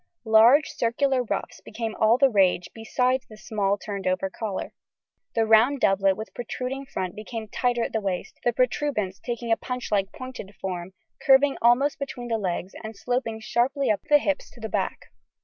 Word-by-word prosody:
Large 230 +7 +6
circular 255 +3 +1
ruffs 235 - -4
became 225 0 -5
all 220 +2 +4
the 270 0 +4
rage 185 -4 +2
besides 250 +3 0
the 215 - -13
small 205 -3 -1
turned 200 -2 -5
over 185 +1 0
collar. 205 -3 -4 0.6
The 225 -1 +3
round 225 +6 +5
doublet 195 -2 +3
with 220 - -7
protruding 255 +3 -5
front 185 -7 -4
became 220 +1 -6
tighter 240 +1 0
at - - -4
the 220 - 0
waist, 190 -3 -4
the 240 - +3
protuberance 240 -5 0
taking 235 -1 -4
a 225 - +4
punchlike 210 -6 -2
pointed 255 -8 -9
form 185 -1 -5 0.3
curving 275 +1 +5
to - - -11
almost 245 +5 +3
between 245 -3 -5
the 225 -1 0
legs 185 -1 -3
and 220 0 -7
sloping 225 +1 -2
sharply 265 +4 +1
up 210 - -1
the 295 - +8
hips 290 0 -2
to 245 - -16
the 220 -1 -5
back. - - -3
225 Hz, 180 wpm, -25 LUFS, 205-255 Hz, 0.6 s, the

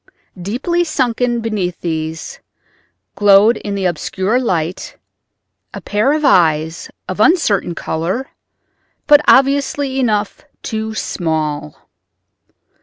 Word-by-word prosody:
Deeply 270 - -1
sunken 245 -6 -1
beneath 205 -6 -3
these, 160 -1 -4 0.8
glowed 205 +3 +5
in 200 -1 -5
the 195 -1 -2
obscure 190 +6 -1
light 180 -8 -3 0.8
a - - -5
pair 210 +6 0
of 305 -1 -1
eyes 160 - +2 0.2
of 185 +2 -5
uncertain 210 - +2
color, 180 +15 -3 0.7
but 290 0 +6
obviously 275 0 +2
enough 210 -5 -1 0.2
too 220 -2 -4
small. 155 -5 -3
205 Hz, 100 wpm, -16 LUFS, 170-255 Hz, 0.8 s, but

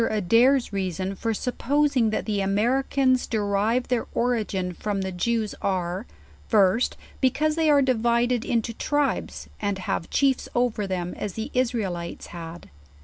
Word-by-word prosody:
Adairs 230 +5 +3
reason 190 0 -2
for 225 +4 -2
supposing 255 +2 +1
that 215 - -2
the 205 -2 0
Americans 255 +6 +2
derivo 215 +3 +1
their 245 -2 -1
origin 210 -7 0
from 200 +2 -3
the 190 0 -3
Jews, 220 +4 -1
are, 185 -2 -2 0.4
First, 205 +4 +3 0.2
because 285 +4 +2
they 320 -1 +2
are 285 -2 +5
divi 235 -2 +2
ded 245 -2 0
into 230 -1 -1
tribes, 290 +4 -1
and 205 -2 -1
have 185 -3 -3
chiefs 270 -2 +1
over 240 -4 +1
them 180 -2 -3
as 205 - -4
the 220 - -5
Israelita 210 -9 -2
had. 170 0 -9
225 Hz, 145 wpm, -25 LUFS, 195-250 Hz, 0.4 s, are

